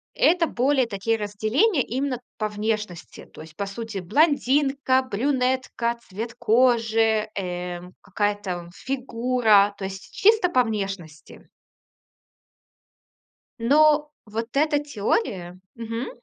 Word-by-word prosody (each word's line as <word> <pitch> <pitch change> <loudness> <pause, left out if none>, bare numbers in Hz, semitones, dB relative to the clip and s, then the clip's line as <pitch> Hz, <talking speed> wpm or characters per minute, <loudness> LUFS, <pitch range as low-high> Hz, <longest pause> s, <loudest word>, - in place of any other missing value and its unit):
это 340 -1 +3
более 260 +1 +2
такие 225 +2 -1
разделения 220 - +1
именно 260 0 -2 0.2
по 215 -1 -1
внешности. 210 -4 -4
То - - -14
есть, 160 -1 -13
по 200 - -3
сути, 215 0 -6
блондинка, 270 - +2
брюнетка, 255 -1 -1
цвет 225 +5 -5
кожи, 225 -2 +2
эм, 180 -1 -5
какая 205 +1 -1
там 180 -4 -6
фигура, 240 -5 +2
то 195 - -5
есть 190 0 -8
чисто 430 -3 +4
по 255 -6 +3
внешности. 195 -8 -6 2.1
Но 300 +4 +4 0.2
вот 225 +2 -4
эта 295 0 +3
теория 200 - -2 0.2
мгм... 230 +1 -5
225 Hz, 105 wpm, -24 LUFS, 200-260 Hz, 2.1 s, чисто